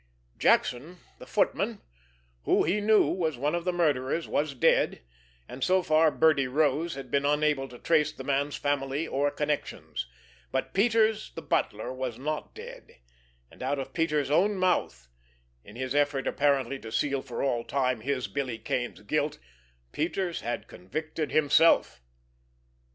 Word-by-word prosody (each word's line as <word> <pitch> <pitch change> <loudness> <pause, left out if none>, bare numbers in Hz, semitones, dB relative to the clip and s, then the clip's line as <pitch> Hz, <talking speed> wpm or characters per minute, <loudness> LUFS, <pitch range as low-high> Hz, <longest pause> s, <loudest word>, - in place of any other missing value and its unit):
Jackson, 145 +9 +2 0.2
the - - -11
footman, - - 0 0.7
who - - +3
he 195 +6 +1
knew 215 +1 +5
was 160 -7 -1
one 145 +5 0
of 175 0 -2
the 180 - +2
murderers, 155 -3 0
was 145 -1 -1
dead, 125 - +2 0.4
and 130 - -6
so 185 0 +3
far 155 0 +4
Birdie 150 -3 +3
Rose 150 +3 +1
had 135 -3 -8
been 140 0 +2
unable 145 -1 +1
to 125 - -12
trace 155 +1 +2
the 135 - -9
man's 140 +1 0
family 145 +2 -1
or 145 +2 +1
connections; 145 - -3 0.4
but - - -2
Peters, 220 +1 +2
the 165 - -5
butler, 110 +4 -1
was 130 -3 -4
not 150 +4 -4
dead, - - -11 0.6
and - - -16
out 145 - -1
of 135 - -6
Peters' 150 -4 0
own 200 +7 +3
mouth, 180 - 0 0.6
in 105 - -14
his 130 +1 -3
effort 145 -2 +1
apparently 140 -1 +1
to 110 - -9
seal 135 +4 0
for 125 -3 -5
all 120 -4 0
time 130 -4 0
his, 130 +1 -2
Billy 130 -5 -3
Kane's, 120 +1 -3
guilt, 150 +7 -1 0.5
Peters 175 - -2
had 120 - -4
convicted 155 - -5
himself! 150 - +4
145 Hz, 150 wpm, -28 LUFS, 130-160 Hz, 0.7 s, knew